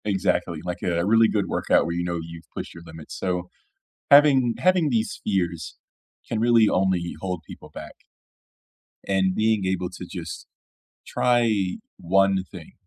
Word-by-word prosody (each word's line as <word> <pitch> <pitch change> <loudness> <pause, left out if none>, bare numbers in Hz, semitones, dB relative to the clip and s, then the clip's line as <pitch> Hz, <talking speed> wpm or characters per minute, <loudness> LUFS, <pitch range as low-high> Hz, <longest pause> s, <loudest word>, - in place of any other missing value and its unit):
Exactly, 95 -5 0
like 90 0 -4
a 85 -1 0
really 115 +2 +5
good 100 -3 0
workout - - +2
where 85 - -2
you 85 +1 -2
know 85 -1 -2
you've 85 -1 -11
pushed - - -6
your 85 - -11
limits. 80 -2 -10
So, 90 -1 -2 0.6
having 140 -4 +6
having 180 -4 +3
these 115 -2 -1
fears 85 - -2 0.5
can 110 - -2
really 115 -2 +5
only 90 -2 0
hold 90 -3 -3
people - - -12
back. - - -10 1.1
And 95 -1 +1
being 110 -2 +1
able 95 -1 -1
to 95 - -9
just - - -7 0.6
try 115 -6 +2 0.3
1 95 +2 +2
thing, - - -11
95 Hz, 150 wpm, -24 LUFS, 85-110 Hz, 1.1 s, having